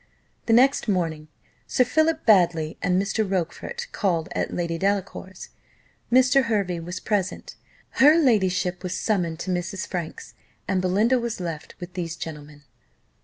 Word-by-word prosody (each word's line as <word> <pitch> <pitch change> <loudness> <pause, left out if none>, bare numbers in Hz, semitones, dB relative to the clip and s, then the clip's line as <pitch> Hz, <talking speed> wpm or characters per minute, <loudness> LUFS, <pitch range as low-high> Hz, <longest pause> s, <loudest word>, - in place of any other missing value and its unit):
The 225 - +3
next 260 +2 +4
morning, 165 -6 -1 0.4
Sir 255 - +3
Philip 315 +5 +1
Baddely 175 -7 +3
and 180 0 +2
Mr. 200 +3 0
Rochfort 195 - -3
called 175 -4 -1
at - - -2
Lady 170 -1 -2
Delacour's 195 -1 -3 0.6
Mr. 260 +1 +5
Hervey 200 -6 -1
was 175 +2 -6
present 200 -3 -2 0.5
her 300 +4 +8
ladyship 190 - +2
was 180 -1 -3
summoned 175 -7 -1
to 185 - -3
Mrs. 180 +2 -3
Franks, 175 -4 -6 0.3
and 190 -1 +1
Belinda 210 +8 +2
was 235 -2 -4
left 165 -4 -6
with 175 0 -8
these 170 -3 -4
gentlemen. 150 -2 -9
185 Hz, 140 wpm, -24 LUFS, 170-225 Hz, 0.6 s, her